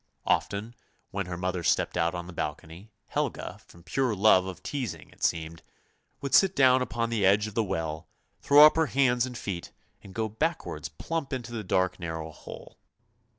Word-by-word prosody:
Often 105 +4 0 0.4
when 100 -2 -3
her 90 -1 -5
mother 90 0 -2
stepped - - +1
out 85 +1 +1
on 85 - -4
to 85 - -12
the - - -9
balcony, 80 +5 -6 0.2
Helga, - - -3
from 85 - -17
pure 115 +6 0
love 95 -2 +5
of 95 - -8
teasing 115 - -5
it - - -14
seemed, 80 0 -1 0.6
would 140 - -4
sit 195 -1 +5
down 130 -1 +5
upon 115 -2 -2
the 110 -3 0
edge 100 +2 +4
of 110 - -7
the 115 - +1
well, 80 -4 -3 0.3
throw 145 +1 +8
up 155 - +5
her 160 -1 +3
hands 125 -2 +2
and 125 -2 -7
feet, 90 -7 -5 0.3
and 95 -1 -13
go 110 -1 0
backwards 110 -7 -3
plump 155 - -4
into 125 -3 -4
the 115 -2 -4
dark 95 0 0
narrow 80 -2 -5
hole. - - -12
100 Hz, 190 wpm, -28 LUFS, 85-125 Hz, 0.6 s, throw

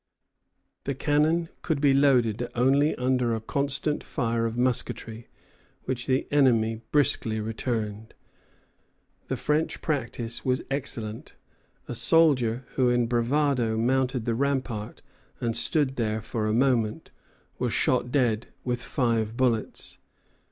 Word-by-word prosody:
The 140 - -2
cannon 155 +4 +1
could 160 -4 -1
be 140 -1 +4
loaded 125 -4 +3
only 135 +5 +3
under 125 -2 +1
a - - -3
constant 140 +5 -2
fire 115 -3 -1
of 115 +1 -5
musketry, 120 -2 -2 0.6
which 125 -2 -3
the 130 -1 +1
enemy 115 -6 +3
briskly 115 -6 +2
returned. 110 -1 -3 1.1
The - - -2
French 150 +2 0
practice 120 -5 -3
was 130 0 0
excellent. 115 -6 -4 0.5
A - - -4
soldier 125 -2 +3
who 130 -2 +2
in 120 -1 +2
bravado 120 -1 +1
mounted 125 0 +1
the 115 - 0
rampart 130 -4 -2 0.4
and 115 -1 -1
stood 140 -4 +2
there 110 -2 0
for 110 -1 -2
a - - +1
moment, 115 -2 +1 0.5
was - - 0
shot 125 -1 +1
dead 120 -5 +1 0.2
with 125 -1 -2
five 115 -5 -1
bullets. 120 -4 -1
125 Hz, 125 wpm, -26 LUFS, 115-140 Hz, 1.1 s, be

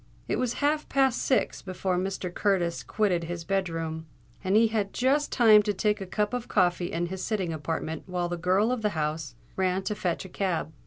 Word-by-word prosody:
It - - 0
was 250 -2 0
half 300 +1 +1
past 265 -3 +2
six 260 - +1
before 185 0 -2
Mr. 185 -1 -2
Curtis 180 -5 +1
quitted 185 -6 0
his 170 0 -5
bed 195 +1 0
room; 160 -1 -4 0.4
and 190 +1 +1
he 225 +1 +5
had 210 -3 -1
just 280 +4 +2
time 220 -4 +7
to 205 0 -1
take 210 +2 +1
a 190 - -5
cup 210 +4 -1
of 245 -1 -3
coffee 175 -2 +1
in 170 +1 -1
his 185 +1 -5
sitting 190 -7 -1
apartment 160 0 -4
while 180 -1 -1
the 175 - -2
girl 185 +6 +2
of 250 -2 -1
the 210 -6 -1
house 150 -4 -2 0.2
ran 190 0 0
to 210 - -1
fetch 180 -3 -2
a - - -9
cab. 175 -5 -2
190 Hz, 210 wpm, -27 LUFS, 175-215 Hz, 0.4 s, time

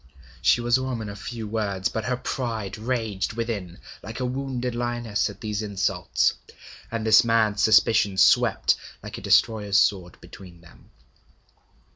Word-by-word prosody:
She 120 - +3
was 120 +1 +2
a - - -3
woman 120 -5 -4
of 100 -1 -9
few 115 -1 -6
words; 100 -4 -2
but 110 -1 -4
her 125 0 -1
pride 115 -6 -4
raged 110 -3 -2
within 105 -6 -4 0.2
like 115 +2 -8
a 130 - -1
wounded 125 -1 -3
lioness 120 -3 -2
at - - -12
these 105 -2 -3
insults, 95 -4 0 0.6
and 115 -1 -4
this 110 -1 +6
mad 110 -3 +2
suspicion 105 -2 +4
swept - - +4 0.3
like - - -7
a - - -12
destroyer's 105 -3 +2
sword 95 -3 +1
between 90 -3 -14
them. 85 0 -19
110 Hz, 150 wpm, -24 LUFS, 100-120 Hz, 0.6 s, this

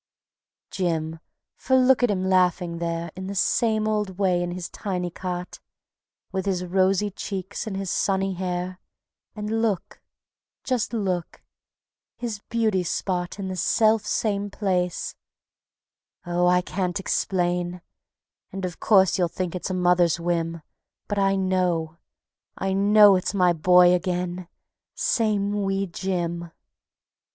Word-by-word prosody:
Jim! 165 -3 -2 0.4
For 260 - +1
look 260 0 +5
at 245 - +3
him 190 -2 0
laughing 180 -2 +2
there 170 0 -3
In 185 +1 -6
the 200 - -5
same 215 +3 +1
old 210 -4 -1
way 185 -3 +2
in 175 - -2
his 175 0 -5
tiny 180 -4 -4
cot, 180 0 -5 0.7
With 190 0 -3
his 180 -2 0
rosy 190 +3 +2
cheeks 195 +2 -5
and 195 -3 -3
his 195 -2 -3
sunny 195 -1 0
hair, 180 0 -3 0.6
And 215 +1 -2
look, 210 -6 -2 0.6
just 255 -4 -1
look... 190 -7 -3 0.7
his 230 -4 -4
beauty 220 -5 +1
spot 180 +1 -2
In 195 -2 -4
the 185 - -4
selfsame 215 0 +1
place.... 180 -4 -1 1.1
Oh, 175 0 +1
I 180 0 +4
can't 185 +1 -2
explain, 180 -2 -1 0.7
And 190 -1 -4
of 175 -2 -6
course 190 -3 +4
you 175 - +3
think 180 0 -4
it's 180 - -4
a 185 - -1
mother's 175 -2 +3
whim, 170 -1 -2 0.4
But 205 -1 -1
I 195 0 +3
know, 180 -4 0 0.6
I 195 0 -1
know 205 +1 +6
it's 185 - -3
my 180 -2 +4
boy 180 +2 +6
again, 180 0 -2 0.5
Same 205 -3 +1
wee 195 0 0
Jim. 170 -2 -3
185 Hz, 130 wpm, -24 LUFS, 175-200 Hz, 1.1 s, know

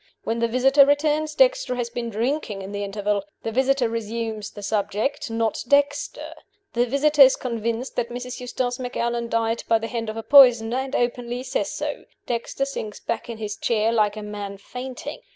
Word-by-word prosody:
When 230 +1 -2
the 235 - +2
visitor 270 +4 +5
returns, 300 +2 +1
Dexter - - +3
has 240 -1 -3
been 235 -1 -4
drinking 225 -2 -2
in 195 - -7
the 205 0 -3
interval. 205 0 -1 0.2
The 225 - -2
visitor 265 +1 +2
resumes 225 -1 -4
the 205 - -11
subject 215 +6 -1
not 225 -1 -1
Dexter. 285 +2 +1 0.4
The 240 +1 +2
visitor 290 +3 +3
is 265 -1 +9
convinced 235 +1 -3
that 235 -1 0
Mrs. 250 +1 -6
Eustace 250 0 -3
Macallan 235 -1 -2
died 230 0 0
by 225 - +4
the 225 - -5
hand 230 -1 -3
of 215 - -5
a 225 - -4
poisoner, 245 -4 +6
and 265 +1 -3
openly 245 0 -1
says - - -1
so. - - -4 0.2
Dexter 240 +3 -2
sinks 220 -6 -6
back 230 +1 -4
in 230 - -5
his 210 -2 -4
chair 225 -1 +1
like 215 -2 +2
a 215 - -5
man 205 -1 -6
fainting. 250 +5 -7
235 Hz, 185 wpm, -23 LUFS, 220-260 Hz, 0.4 s, is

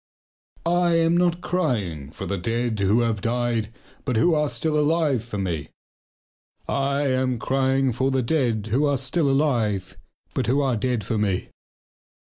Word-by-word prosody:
I 175 0 +2
am 165 0 +3
not 175 0 +2
crying 105 - -1
for - - -7
the 100 -2 -2
dead 115 +2 -1
who 100 +4 +3
have 115 -3 0
died 115 -1 -1 0.3
but 125 -5 -1
who 170 +9 +4
are 150 -1 +1
still 150 +6 0
alive 150 -5 +2
for 115 -3 -6
me. 85 -6 -3 1.0
I 140 +1 0
am 130 -2 +1
crying 135 +1 +1
for 130 +3 0
the 135 -1 +1
dead 115 -6 0
who 140 +6 +3
are 140 -1 +1
still 135 +4 0
alive 110 -10 0 0.4
but 125 - -1
who 130 +4 +2
are 135 -4 +1
dead 120 0 -1
for 110 +3 -2
me. 100 -3 -1
125 Hz, 160 wpm, -24 LUFS, 110-145 Hz, 1.0 s, who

